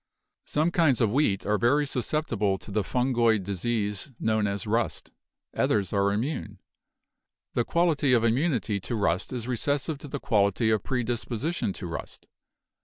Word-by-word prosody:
Some 155 +3 +1
kinds 160 -8 +3
of 110 -4 +2
wheat 115 -7 +1
are 105 0 +1
very 145 +5 +3
susceptible 125 -7 -1
to 100 - -12
the 105 +1 0
fun 125 +6 0
goid 115 -4 +3
disease 105 - -2
known 110 -1 +1
as 100 +1 -3
'rust'; 115 +2 -1 0.4
others 100 -2 +1
are 100 0 +2
immune. 105 -2 -3 1.0
The 120 - +1
quality 165 -5 +2
of 115 -2 +4
immunity 115 -3 +1
to 115 +5 -4
rust 95 -4 0
is 120 -2 -4
recessive 140 +4 -1
to 145 - -9
the 140 0 -4
quality 105 0 +2
of 110 -2 +2
predisposition 120 - -2
to - - -7
rust. 85 - -7
115 Hz, 155 wpm, -27 LUFS, 105-135 Hz, 1.0 s, of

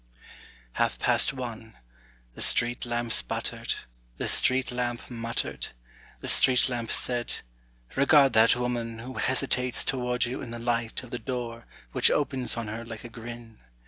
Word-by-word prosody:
Half - - +1
past - - +2
one, 115 -4 -7 0.6
The - - -7
street 120 +1 +1
lamp 120 0 -1
sputtered, - - +1 0.4
The - - -2
street 130 0 +3
lamp 120 0 -3
muttered, 115 0 -3 0.5
The - - -6
street 130 -2 +5
lamp 120 -2 -3
said, 120 -1 0 0.6
âRegard 140 0 +5
that 110 +1 +6
woman 120 -2 -2
Who 125 +3 -7
hesitates 125 -1 +2
toward 125 -2 0
you 120 +2 -4
in 125 - -7
the 120 - -6
light 115 0 -1
of 125 - -12
the 120 - -3
door 120 -3 -5 0.2
Which - - +5
opens 135 -5 0
on 115 -2 -3
her 110 +2 -5
like 115 -2 -9
a 120 - -8
grin. 115 -1 -10
120 Hz, 150 wpm, -27 LUFS, 115-125 Hz, 0.6 s, that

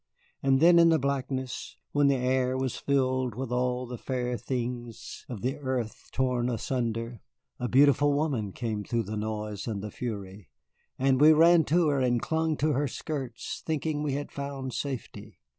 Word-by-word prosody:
And 135 -1 +3
then 170 +2 +7
in 170 0 +7
the 165 - +5
blackness, 130 -2 -3
when 145 -1 +3
the 140 - +4
air 130 0 +1
was 130 -2 -1
filled 130 -4 0
with 130 0 -4
all 125 0 0
the 120 -1 -7
fair 125 -2 -2
things 120 0 -5
of 115 -6 -6
the 130 +4 -1
earth 130 -5 -4
torn 125 -2 0
asunder, 115 -1 -2 0.4
a 125 - -1
beautiful 145 +2 +5
woman 140 -9 0
came 110 -1 -3
through 115 +2 -1
the 105 +2 -5
noise 105 -1 -4
and 105 -3 -3
the 105 - -5
fury, 100 -5 -6 0.5
and 135 0 +2
we 155 +1 +9
ran 165 +1 +6
to 165 0 +3
her 140 -2 +1
and 125 -2 +2
clung 160 +2 0
to 155 +2 +1
her 145 +2 +1
skirts, 130 -3 -5
thinking 155 -1 -1
we 150 -2 -1
had 145 +1 -4
found 140 -2 -5
safety. 110 - -5
130 Hz, 175 wpm, -28 LUFS, 120-140 Hz, 0.5 s, we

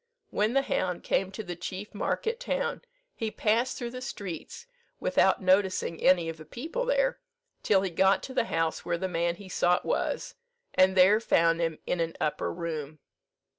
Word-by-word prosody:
When 215 +3 +1
the 275 0 +3
hound 180 -8 -1
came 190 - +1
to 215 +3 -6
the 175 -2 -5
chief 185 +4 -6
market 450 - -1
town, - - -2 0.3
he 225 - -3
passed 230 +4 +1
through 240 -2 -4
the 255 0 -7
streets, 200 - -6 0.3
without - - +2
noticing 185 -3 +2
any 175 -2 +4
of 165 0 -4
the 155 - -10
people 320 - -4
there, - - +2 0.4
till 195 -2 +3
he 190 - -2
got 190 +3 +3
to 260 - -7
the 230 - +1
house 165 -5 -1
where 170 - -1
the 190 +2 -2
man 170 -1 0
he 195 +2 -12
sought 180 -1 +1
was, - - -1 0.4
and 190 0 +4
there 195 +4 +7
found 165 -6 +3
him 165 -2 -1
in 180 - -1
an 165 0 -2
upper 150 - -1
room. 155 -3 -5
190 Hz, 180 wpm, -28 LUFS, 170-230 Hz, 0.4 s, there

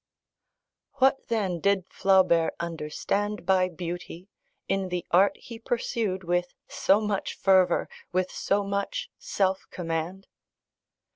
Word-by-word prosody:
What, 270 0 +2
then, 195 -7 -1
did 200 0 +2
Flaubert 185 -4 +3
understand 170 +5 -2
by 185 0 +3
beauty, 175 +2 -7 0.4
in 195 -1 0
the 180 -1 -3
art 190 +3 +4
he 230 -1 -10
pursued 225 -5 -2
with 175 +1 -1
so 195 +2 +3
much 210 -2 -2
fervour, 185 -2 +3 0.2
with 185 0 0
so 200 +1 0
much 200 0 -3
self 190 -1 0
command? 170 +2 -4
190 Hz, 115 wpm, -27 LUFS, 175-200 Hz, 0.4 s, art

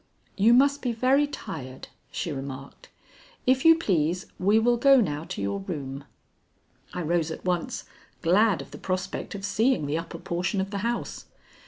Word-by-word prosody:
"You 225 +4 +5
must 280 +2 +4
be 245 -2 -1
very 265 +5 +3
tired," 130 - -8 0.2
she 170 - -4
remarked. 135 -1 -8 0.6
"If 260 +1 +3
you 325 0 +9
please 180 - 0
we 200 +4 +4
will 240 +2 +3
go 275 +2 +6
now 150 -7 -1
to 100 - -5
your 100 0 -1
room." 135 +6 -6 0.9
I 180 - -4
rose 165 0 0
at 160 - -7
once, 180 -2 -1 0.4
glad 190 +3 +3
of - - -17
the - - -9
prospect 185 +2 -3
of 195 0 -5
seeing 225 - +1
the 150 +3 -1
upper 170 0 -7
portion 180 +4 -2
of 195 +1 -2
the 200 - -2
house. 235 +3 -3
185 Hz, 170 wpm, -26 LUFS, 155-235 Hz, 0.9 s, you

